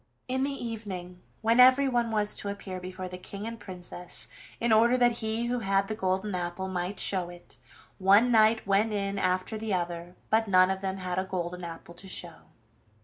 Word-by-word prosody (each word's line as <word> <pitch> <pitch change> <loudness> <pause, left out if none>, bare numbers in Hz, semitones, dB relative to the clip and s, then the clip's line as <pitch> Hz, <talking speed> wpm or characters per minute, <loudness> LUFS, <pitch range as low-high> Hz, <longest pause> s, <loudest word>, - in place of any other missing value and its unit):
In 260 +1 0
the 280 - +1
evening, 205 -9 -6 0.2
when 230 +2 +3
everyone 255 -2 +5
was 210 -2 +1
to 200 - -5
appear 195 -2 -6
before 185 0 -6
the 180 0 -8
King 200 +3 -7
and 230 0 -6
Princess, 180 -2 -3 0.3
in 235 -1 +2
order 235 +3 +5
that 240 -1 +3
he 220 +1 -1
who 245 +1 0
had 195 -2 +1
the 215 - -2
golden 190 0 -1
apple 180 +1 -3
might 185 +1 -3
show 185 -3 0
it, 175 0 -13 0.4
one 200 +6 +5
knight 220 0 +4
went 205 +2 +2
in 200 -1 -1
after 185 +3 0
the 215 -3 -1
other, 175 0 -4 0.2
but 220 0 +3
none 185 -1 +5
of 190 0 -3
them 190 -1 -2
had 185 -1 -2
a - - 0
golden 180 -1 -4
apple 170 0 -8
to 180 +3 -10
show. 185 - -4
195 Hz, 195 wpm, -28 LUFS, 185-225 Hz, 0.4 s, everyone